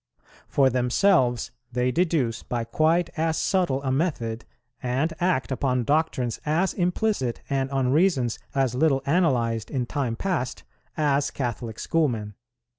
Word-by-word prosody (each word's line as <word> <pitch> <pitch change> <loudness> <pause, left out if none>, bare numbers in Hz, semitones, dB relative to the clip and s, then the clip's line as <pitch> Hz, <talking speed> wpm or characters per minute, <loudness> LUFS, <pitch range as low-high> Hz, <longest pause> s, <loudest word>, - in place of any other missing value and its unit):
For 135 -2 +3
themselves 125 - +2 0.2
they 125 +1 +1
deduce 155 -8 0
by 120 -1 -3
quite 165 +7 +1
as 160 0 +1
subtle 175 -9 +1
a 130 - 0
method, 130 -7 -1 0.4
and 135 +6 0
act 175 -7 0
upon 130 -2 0
doctrines 135 -4 0
as 165 +5 +1
implicit 180 - 0
and 135 -1 0
on 135 -2 0
reasons 145 - +2 0.2
as 135 -3 +1
little 135 0 +2
analyzed 125 -9 +1
in 130 -3 -1
time 125 -2 -2
past, 155 -6 -2 0.3
as 145 -2 +2
Catholic 120 -3 -4
schoolmen. 120 -11 0
135 Hz, 130 wpm, -25 LUFS, 125-160 Hz, 0.4 s, For